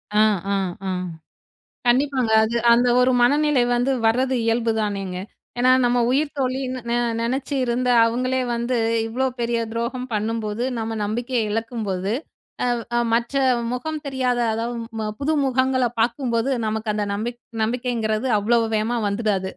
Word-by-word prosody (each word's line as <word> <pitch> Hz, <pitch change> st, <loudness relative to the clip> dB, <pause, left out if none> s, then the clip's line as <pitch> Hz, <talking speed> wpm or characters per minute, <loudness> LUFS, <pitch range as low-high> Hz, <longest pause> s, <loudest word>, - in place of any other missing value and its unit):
அ, -, -, +3 dB, 0.3 s
அ, -, -, +2 dB, 0.3 s
அ. -, -, -1 dB, 1.0 s
கண்டிப்பாங்க. 255 Hz, -2 st, +2 dB
அது- 230 Hz, +2 st, -1 dB, 0.2 s
அந்த 245 Hz, +1 st, +3 dB
ஒரு 255 Hz, +1 st, +4 dB
மனநிலை 290 Hz, +1 st, +3 dB
வந்து 245 Hz, +3 st, +1 dB
வரது 255 Hz, +3 st, +2 dB
இயல்பு 230 Hz, 0 st, +1 dB
தானேங்க? 195 Hz, -3 st, -2 dB, 0.4 s
ஏன்னா 255 Hz, +1 st, +5 dB
நம்ம 245 Hz, 0 st, +2 dB
உயிர்த்தோழின்னு 265 Hz, -2 st, -1 dB
ந 235 Hz, -, +1 dB, 0.3 s
நெனச்சு 265 Hz, +4 st, -2 dB
இருந்த 250 Hz, +1 st, 0 dB, 0.2 s
அவங்களே 255 Hz, +3 st, 0 dB
வந்து, 235 Hz, +2 st, -1 dB, 0.3 s
இவ்வளோ 255 Hz, +4 st, -1 dB
பெரிய 235 Hz, 0 st, 0 dB
துரோகம் 240 Hz, +2 st, -3 dB
பண்ணும்போது, 215 Hz, +1 st, -2 dB, 0.2 s
நம்ம 225 Hz, 0 st, -3 dB
நம்பிக்கைய 240 Hz, +4 st, -1 dB
இழக்கும்போது, 210 Hz, -4 st, -2 dB, 0.5 s
அ, -, -, +1 dB, 0.3 s
அ -, -, +3 dB
மற்ற 235 Hz, +4 st, 0 dB, 0.4 s
முகம் 310 Hz, +4 st, -4 dB
தெரியாத, 255 Hz, -2 st, 0 dB
அதாவது 235 Hz, +2 st, -3 dB, 0.2 s
ம 215 Hz, -1 st, -2 dB
புது 300 Hz, +3 st, 0 dB
முகங்கள 260 Hz, 0 st, +1 dB, 0.2 s
பார்க்கும்போது 235 Hz, +1 st, 0 dB, 0.2 s
நமக்கு 220 Hz, 0 st, -2 dB
அந்த 210 Hz, -1 st, -1 dB
நம்பிக் 235 Hz, +4 st, -4 dB, 0.2 s
நம்பிக்கைங்கிறது 230 Hz, -1 st, -1 dB
அவ்வளோ 235 Hz, +3 st, +3 dB, 0.2 s
வேகமா 225 Hz, +3 st, 0 dB
வந்துடாது. 200 Hz, -3 st, -1 dB
240 Hz, 135 wpm, -22 LUFS, 225-255 Hz, 1.0 s, ஏன்னா